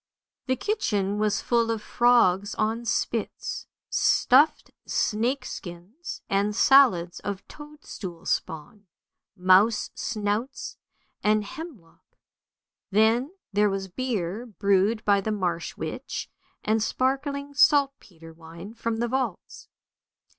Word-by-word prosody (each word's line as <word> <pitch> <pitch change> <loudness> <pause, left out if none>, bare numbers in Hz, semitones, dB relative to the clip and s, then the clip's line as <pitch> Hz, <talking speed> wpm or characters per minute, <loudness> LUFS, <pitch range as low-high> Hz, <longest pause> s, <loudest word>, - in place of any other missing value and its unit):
The 260 - +2
kitchen 210 - -1
was 210 -1 +1
full 235 -1 +1
of 225 -1 -1
frogs 210 -5 +3
on 225 +2 -1
spits, - - -2 0.2
stuffed 275 +5 +3 0.2
snake 240 +6 0
skins, 200 - -8
and 200 +1 0
salads 225 -11 +4
of 200 -1 -6
toadstool 255 - -10
spawn, 175 +6 -4 0.5
mouse 190 +5 +4
snouts 215 +4 -3 0.5
and 210 0 +2
hem 320 +6 -8
lock. 165 -1 -29 0.7
Then 225 - +2 0.2
there 205 +1 +3
was 195 -1 -4
beer 220 -1 -3
brewed 200 +1 +1
by 200 -1 +4
the 215 - -2
marsh 180 -5 -2
witch, - - -5 0.3
and 220 +1 +1
sparkling 280 +4 -1
saltpetre 275 - +1
wine 165 +5 -11
from 230 -1 -3
the 240 +1 -1
vaults. 260 +2 -4
215 Hz, 110 wpm, -26 LUFS, 195-255 Hz, 0.7 s, salads